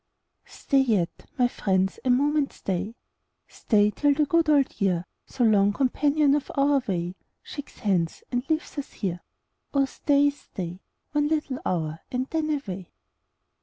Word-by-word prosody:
Stat 270 -2 +1
yet, 195 -7 -1
my 250 -1 +4
friends, 190 -5 0
a 260 - 0
moment 285 +3 +2
stay 195 +4 -3 0.3
— - - -51 0.2
Stay 210 -2 +2
till 290 +5 +2
the 300 +1 +3
good 330 +1 +2
old 280 -6 +2
year, 180 -3 +1 0.2
So 255 - -1
long 205 -2 +4
companion 285 +3 +2
of 290 -1 -1
our 280 0 +3
way, 175 -2 -1 0.3
Shakes 285 -2 -9
hands, 185 -7 0
and 245 -1 0
leaves 315 -1 -1
ns 280 - -7
here. 180 -4 -3 0.6
Oh 275 -1 +4
stay, 285 +1 +2
oh - - +5
stay. 180 -10 -7 0.3
One 295 0 +2
little 300 -4 -1
hour, 160 -3 -2
and 255 0 -1
then 315 -1 0
away. 195 - -3
255 Hz, 160 wpm, -26 LUFS, 190-290 Hz, 0.6 s, oh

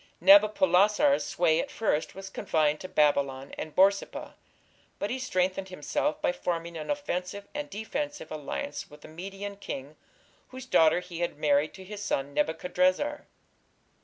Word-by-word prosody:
Nabopolassar's 205 - +5
sway 165 -2 +2
at - - -2
first 180 -8 -1
was 195 0 -8
confined 155 -4 +1
to 185 - -7
Babylon 140 -4 +1
and 155 -1 -7
Borsippa, 195 +1 +2 0.6
but 205 - -3
he 260 - -2
strengthened 190 -4 -1
himself 155 -3 -2
by - - +3
forming 170 -1 -3
an 155 -2 -6
offensive 200 -8 -3
and 295 0 -4
defensive 290 +8 -4
alliance 155 - -5
with 150 0 -15
the - - -11
Median 195 +5 -7
king, 145 -6 -7 0.5
whose 260 0 -9
daughter 165 -8 +4
he 175 -2 -8
had 175 -4 -2
married 150 0 +2
to 190 - -10
his 205 +2 -8
son 140 -8 -2
Nebuchadrezzar. 185 - 0
185 Hz, 145 wpm, -28 LUFS, 155-205 Hz, 0.6 s, Nabopolassar's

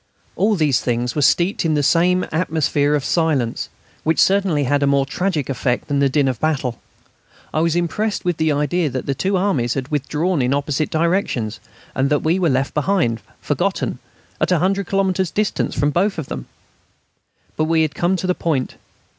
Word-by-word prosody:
All 210 +2 +2
these 150 -7 +2
things 120 0 -1
were 150 - -1
steeped 175 +8 +2
in 160 -2 +1
the 145 - +1
same 180 +5 +3
atmosphere 155 -3 +1
of 145 - -2
silence, 150 -9 0 0.3
which 160 +1 +1
certainly 190 -7 +3
had 145 +2 +1
a 140 - +2
more 140 -1 +3
tragic 160 -1 -1
effect 125 -2 -1
than 145 -1 0
the 140 -1 +3
din 140 +1 +2
of 130 -4 -2
battle. 135 -6 -1 0.7
I - - +1
was 165 0 +1
impressed 200 +5 -1
with 175 -3 0
the 160 -1 +1
idea 150 +3 0
that 130 0 -4
the 140 - 0
two 190 +8 0
armies 150 - 0
had 135 0 -3
withdrawn 150 +3 0
in 125 +2 +1
opposite 145 +1 -1
directions, 160 - 0 0.3
and 135 +1 +1
that 145 0 +1
we 165 +4 +2
were 175 -3 +2
left 135 +1 0
behind, 150 - 0 0.2
forgotten, - - -1 0.4
at - - +1
100 185 +2 +1
kilometres 190 -2 +1
distance 210 +3 -1
from 145 +2 +1
both 190 +6 +1
of 160 - -5
them. - - -6 1.1
But 155 - 0
we 160 0 +2
had 155 - 0
to - - -15
come 175 +2 +3
to 185 - -3
the 180 - +2
point. 150 -8 -2
155 Hz, 190 wpm, -20 LUFS, 140-180 Hz, 1.1 s, same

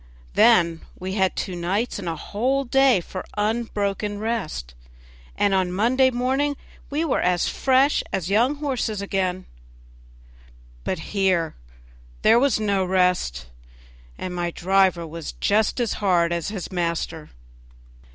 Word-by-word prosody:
Then 170 -8 +4 0.2
we 185 +1 -5
had 190 -2 +1
two 185 - -3
nights 195 +7 -1
and 180 -4 -4
a 165 - -3
whole 255 - -1
day 270 -5 +4
for 185 +2 -7
unbroken 210 -2 -1
rest, 205 - -3 0.6
and 205 -1 +2
on 185 -2 +1
Monday 245 +7 +3
morning 265 +3 0 0.3
we 300 +3 -1
were 295 - +1
as 180 0 +1
fresh 270 +2 +3
as 185 -3 -2
young 235 +9 +2
horses 260 -8 -2
again; 185 -2 -1 1.4
but 185 - -2 0.2
here 185 -5 +1 0.7
there 235 - +6
was 265 -4 +2
no 200 -3 +1
rest, 180 - +1 0.7
and 180 - -5
my 175 -1 -1
driver 185 -1 +2
was 165 0 -7
just 215 +4 +1
as 235 -3 0
hard 175 -4 +2
as 170 -2 -2
his 200 -3 -5
master. 170 -3 -3
195 Hz, 130 wpm, -23 LUFS, 180-235 Hz, 1.4 s, there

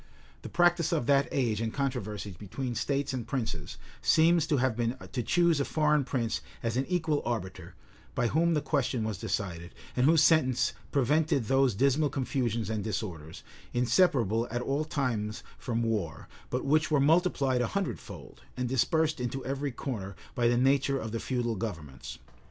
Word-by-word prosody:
The - - -8
practice 175 -1 +3
of 155 -8 0
that 140 +1 +3
age 115 -5 0
in 115 - 0
controversies 105 -7 -3
between 120 +7 -5
states 140 +3 -1
and 125 -3 -4
princes, 110 - -3 0.2
seems 165 0 +4
to 155 -3 +2
have 130 -2 +1
been 120 +2 -1
to 125 - -1
choose 170 +5 +3
a - - +2
foreign 150 -2 +2
prince 115 - -1 0.2
as 115 -1 -1
an 130 +2 0
equal 160 -5 0
arbiter, 110 -6 -4 0.4
by - - +1
whom 165 +7 +2
the 150 - 0
question 135 -5 0
was 110 -4 -3
decided, 85 -4 -4 0.2
and 125 +2 +3
whose 160 -1 +5
sentence 135 -7 +3 0.2
prevented 145 -1 +2
those 135 -1 +3
dismal 140 +5 +2
confusions 120 -5 -1
and 110 -2 -2
disorders, 90 -8 -5 0.3
inseparable 120 - +2
at 120 +1 -2
all 140 +4 -1
times 115 -8 -2 0.2
from 115 -2 -1
war, 100 -9 -2 0.2
but 125 - -2
which 155 +3 +3
were 150 -3 +3
multiplied 140 -4 +3
a 120 - +1
hundred 195 -4 -2
fold, - - -11 0.2
and 125 0 -1
dispersed 155 +5 +1
into 125 +2 -3
every 135 +1 -2
corner, 105 -7 -5 0.2
by 120 -1 +2
the 120 0 +3
nature 135 +2 +3
of 110 -4 -5
the 115 - -2
feudal 120 -2 -1
governments. 75 - -6
125 Hz, 170 wpm, -29 LUFS, 110-145 Hz, 0.4 s, whose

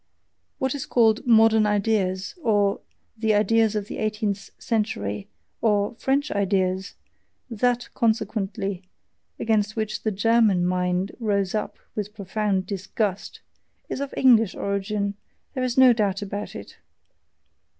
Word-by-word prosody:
What 265 -1 -1
is 285 - -5
called 225 0 +3
"modern 220 -2 +5
ideas," 200 -3 0
or 205 -5 +2 0.3
"the 220 -1 +1
ideas 220 +1 +3
of 210 -1 -1
the - - -6
eighteenth 210 -2 -2
century," 105 - -2 0.3
or 205 -2 +2
"French 275 +5 0
ideas" 190 -1 0 0.6
that, 245 +2 0
consequently, 200 -4 -1 0.6
against 215 -2 +1
which 215 -1 -3
the 220 - 0
GERMAN 210 -3 +3
mind 180 +1 0
rose 200 -4 0
up 215 - -3 0.2
with 210 0 -5
profound 200 -1 -1
disgust 195 +1 -3 0.5
is - - -3
of 280 - -4
English 225 -6 +5
origin, 200 0 -2 0.4
there 255 - -2
is 250 -1 -2
no 260 -2 +8
doubt 205 -3 0
about 205 +1 -6
it. - - -10
210 Hz, 125 wpm, -24 LUFS, 195-225 Hz, 0.6 s, no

